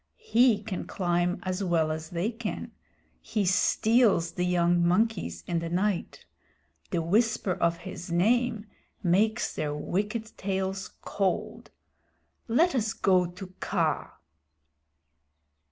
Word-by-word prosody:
He 245 - +3
can 200 -4 -5
climb 175 -1 0
as 185 +1 -2
well 165 -4 +1
as 160 0 -5
they 180 +6 -1
can. 225 -2 -5 0.5
He 210 -3 -1
steals 205 -1 +3
the 180 0 -1
young 175 -1 +3
monkeys 175 - +1
in 170 - -1
the 165 0 -4
night. 185 +2 -1 0.6
The 170 -3 -1
whisper 210 +2 +1
of 170 -1 +1
his 175 0 -8
name 225 +5 +2 0.4
makes 210 +6 +2
their 150 -1 -2
wicked 210 +8 -3
tails 190 0 -2
cold. 195 -2 -2 0.8
Let 315 +10 +3
us 225 -4 0
go 185 -2 +3
to 185 +1 -10
Kaa." - - -1
190 Hz, 120 wpm, -28 LUFS, 175-220 Hz, 0.8 s, He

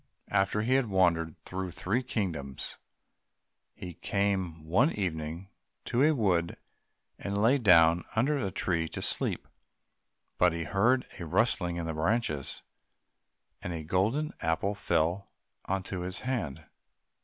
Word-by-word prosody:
After 100 +2 +1
he 125 +3 +2
had 135 -2 +3
wandered 85 -4 +2
through 95 0 -5
three 90 +8 -1
kingdoms, 85 - -4 1.0
he 90 - -7
came 95 -5 -1
one 115 - +3
evening 85 -1 -3 0.4
to 120 - 0
a 155 +3 +6
wood, 90 -8 +1 0.6
and 100 0 -2
lay 120 +7 +4
down 85 -5 +5
under 135 +7 +2
a 100 -6 -1
tree 85 -3 0
to - - -5
sleep. - - 0 0.9
But 90 -2 +5
he 85 0 -3
heard 115 +9 +2
a 85 - -5
rustling 90 -2 +1
in 85 -1 -3
the 80 - -3
branches, 80 - -1 1.0
and 90 - -4
a 80 -1 -5
golden 110 - 0
apple 80 +5 0
fell 90 0 0 0.4
into 95 -1 -2
his 90 +2 -4
hand. 120 - -3
95 Hz, 130 wpm, -29 LUFS, 85-105 Hz, 1.0 s, a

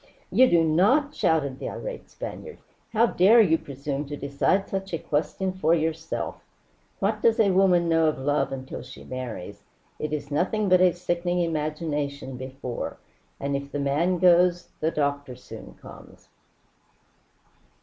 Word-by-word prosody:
"You 260 0 +6
do 170 -1 +4
not!" 210 - +3
shouted 140 - 0
the - - -4
irate - - -7
Spaniard. 480 -1 -8 0.3
"How 225 +1 +4
dare 220 +1 +5
you 165 -7 +4
presume 140 +1 -5
to 145 0 -5
decide 140 +8 0
such 195 -1 -4
a - - -2
question 165 +6 -2
for 170 -3 +2
yourself? 160 0 -3 0.6
What 210 +2 -1
does 230 -1 +3
a 205 -3 +4
woman 180 -2 +4
know 165 -1 +3
of 155 - 0
love 135 0 0
until 130 -1 -6
she - - -12
marries? 110 -6 -7 0.4
It 155 - -3
is 145 -1 -4
nothing 200 +7 0
but 185 0 +5
a 185 -1 +6
sickening 175 0 -1
imagination 150 -4 -2
before; 130 -1 -6 0.4
and 140 0 -2
if 140 0 -5
the - - -3
man 150 +6 +1
goes, 175 0 +4
the 155 - +1
doctor 145 -4 -2
soon 125 - -11
comes." - - -14
160 Hz, 150 wpm, -25 LUFS, 140-185 Hz, 0.6 s, You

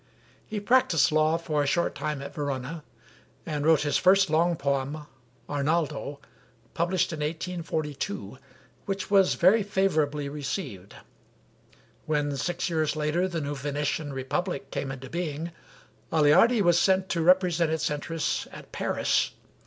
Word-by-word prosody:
He 215 - -3
practiced 205 - +3
law 155 +1 +3
for 155 -3 -1
a 145 - 0
short 170 +5 +1
time 150 -2 -3
at - - -8
Verona, 145 +1 -4 0.6
and 150 -3 -3
wrote 160 -1 +4
his 145 -1 +1
first 190 -2 +4
long 170 +2 +3
poem, 140 +1 -2 0.4
'Arnaldo,' 145 -1 -1 0.5
published 175 +1 0
in 155 - -5
1842, 155 - -4 0.5
which 195 0 -3
was 195 -2 +5
very 195 +6 +5
favorably 155 -8 0
received. 140 - -5 1.1
When 145 -2 0
six 175 +5 -2
years 160 -3 0
later 155 +4 0
the 170 -3 -3
new 145 0 -3
Venetian 145 +1 -2
republic 135 +3 -3
came 135 - -3
into 135 0 -8
being, 165 0 -4 0.6
Aleardi 180 +10 +5
was 175 -1 +4
sent 190 0 +3
to 170 - 0
represent 175 -1 +3
its 160 -1 -1
interests 155 +2 -2
at - - -12
Paris. - - 0
155 Hz, 135 wpm, -27 LUFS, 145-175 Hz, 1.1 s, was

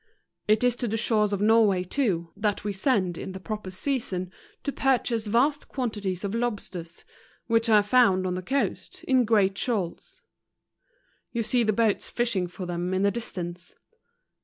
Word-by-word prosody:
It 215 +2 +3
is 245 -1 +3
to 245 - -2
the 225 +1 -1
shores 215 -2 +2
of 200 -1 -1
Norway 210 -4 +4
too, 180 -6 -1
that 205 0 -1
we 205 -1 -2
send 190 - 0
in 190 - -6
the 190 - -7
proper 210 0 -5
season 185 -4 -3 0.3
to 280 - -1
purchase 245 -5 0
vast 275 +7 +2
quantities 210 -8 -3
of 200 0 -2
lobsters, 205 -8 -4 0.4
which 230 0 +2
are 210 -2 +6
found 205 -4 +4
on 180 - -1
the 180 - -3
coast, 270 +9 -2
in 255 -2 +3
great 205 -3 +3
shoals; 225 - -3 1.1
you 235 -1 -1
see 245 +3 +2
the 215 -2 +2
boats 215 -1 +1
fishing 225 -7 0
for 180 +1 -7
them 175 +1 -2
in 190 - +1
the 200 - +3
distance. 180 -6 -6
210 Hz, 165 wpm, -26 LUFS, 185-235 Hz, 1.1 s, are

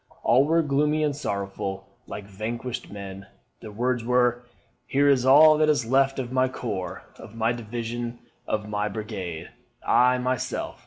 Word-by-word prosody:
All 130 +4 +4
were 165 +2 +3
gloomy 150 +2 +1
and 145 -2 0
sorrowful, 100 -5 -4 0.2
like 105 - -7
vanquished 115 +5 -5
men. 100 -1 -8 0.3
Their 110 - -9
words 120 +2 -1
were, 125 0 +2 0.5
'Here 140 +1 +2
is 130 -2 +3
all 155 +3 +7
that 155 0 +4
is 145 -6 +2
left 135 +3 +2
of 125 -2 -4
my 130 0 +2
corps, 110 -7 -5 0.2
of 115 -1 -12
my 115 +1 +1
division, 120 +1 -5 0.3
of 105 -1 -2
my 105 0 -1
brigade. 100 -6 -6 0.4
I, 125 +1 +4
myself.' 125 0 -3
120 Hz, 155 wpm, -25 LUFS, 105-130 Hz, 0.5 s, all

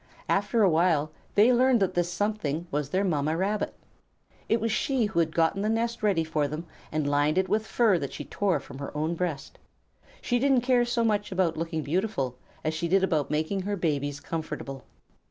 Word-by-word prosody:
After 205 +3 +2
a - - +6
while 160 -2 +2 0.2
they 220 +5 +6
learned 250 0 +4
that 195 - +1
this 175 0 0
Something 175 -5 -1
was 145 -1 -1
their 190 +5 +1
Mamma 155 -3 0
Rabbit. 205 +4 -1 0.7
It 225 - +3
was 225 +1 -1
she 240 +3 +1
who 210 -5 -1
had 160 -1 0
gotten 165 +4 +2
the 210 - 0
nest 230 +1 -1
ready 200 -6 +2
for 155 -2 0
them 155 +4 -5 0.3
and 155 -1 -1
lined 145 +3 +2
it 190 0 +2
with 215 0 0
fur 215 -7 +3
that 140 -3 -4
she - - -7
tore 190 -7 0
from 135 - -11
her 140 +1 -6
own 155 +3 0
breast. 165 -5 -4 0.6
She 245 -1 0
didn't 270 -1 +3
care 245 -1 +3
so 240 -1 0
much 210 -2 0
about 180 -3 +1
looking 165 -1 -3
beautiful 150 - -1 0.3
as 155 - 0
she 165 +2 -2
did 190 +2 +3
about 160 -6 +1
making 160 +6 -1
her 205 +2 -2
babies 145 -5 -1
comfortable. 150 -4 -5
175 Hz, 200 wpm, -27 LUFS, 155-215 Hz, 0.7 s, a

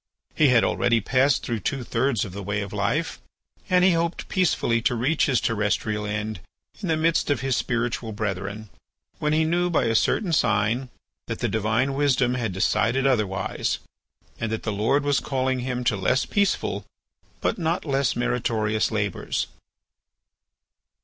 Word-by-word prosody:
He 155 - +4
had 125 -3 +5
already 120 -1 +2
passed 130 +5 +2
through 115 -2 -2
two 130 +6 -2
thirds 120 -2 0
of 95 - -9
the 100 - -6
way 100 +2 -2
of 100 - -6
life, - - -1 0.5
and 180 0 +4
he 190 - +6
hoped 170 0 -1
peacefully 145 -10 +1
to 125 - +1
reach 135 +7 +1
his 130 -4 +3
terrestrial 105 -1 -1
end 105 -1 -3 0.4
in 195 - -3
the 160 -2 +1
midst 165 0 +1
of 145 -4 +1
his 135 -1 0
spiritual 115 -1 -1
brethren, 100 0 -4 0.5
when 150 - 0
he 155 +1 +3
knew 175 +2 +1
by 170 - +2
a 115 - +1
certain 170 - +1
sign 115 0 +1 0.4
that - - -3
the - - -1
Divine 110 +5 0
wisdom 135 -3 +2
had 120 -5 -1
decided 115 +7 +1
otherwise, 105 -7 0 0.6
and 115 -1 -2
that 110 - -3
the 110 - -2
Lord 115 +8 +1
was 145 -1 +2
calling 130 -1 -1
him 125 0 -3
to 115 - +2
less 105 +7 +1
peaceful 200 -1 0 0.6
but - - -1
not 165 +1 -1
less 135 -3 +1
meritorious 110 -3 0
labours. 105 -4 -2
120 Hz, 165 wpm, -24 LUFS, 110-140 Hz, 0.6 s, he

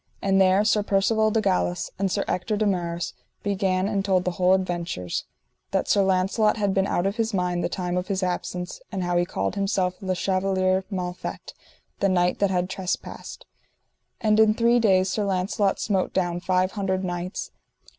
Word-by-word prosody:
And 195 -1 +2
there 190 +2 +4
Sir 215 -1 +3
Percivale 215 +2 +2
de 220 +1 +1
Galis 180 -3 0
and 195 -1 0
Sir - - 0
Ector 205 +4 -1
de 215 - +1
Maris 175 -3 -1 0.3
began 195 -2 0
and 200 -2 0
told 185 -2 +1
the 180 - +1
whole 180 +1 +3
adventures: 175 - -3 0.4
that - - 0
Sir 200 - +4
Launcelot 195 +3 +2
had 205 -2 +1
been 195 0 +2
out 175 - 0
of 200 +3 -1
his 225 -2 0
mind 180 -1 0
the - - 0
time 180 -1 -3
of 180 - -2
his 190 -2 -1
absence, 180 0 -3
and 190 -3 -2
how 175 0 -1
he 175 0 +3
called 95 - -2
himself 195 -2 0
Le 185 -1 -1
Chevaler 185 0 +1
Mal 180 -3 -3
Fet, - - -7 0.5
the 195 - +2
knight 180 -1 +2
that 200 - +3
had 180 -1 0
trespassed; 190 -1 -5 0.7
and 215 -2 +2
in 215 -1 +5
three 235 +1 +3
days 190 -4 +3
Sir 210 +2 -1
Launcelot 195 +1 0
smote 195 -3 0
down 175 -2 0
five 185 +1 +1
hundred 190 -2 -1
knights. 175 +1 -4
190 Hz, 185 wpm, -25 LUFS, 180-200 Hz, 0.7 s, in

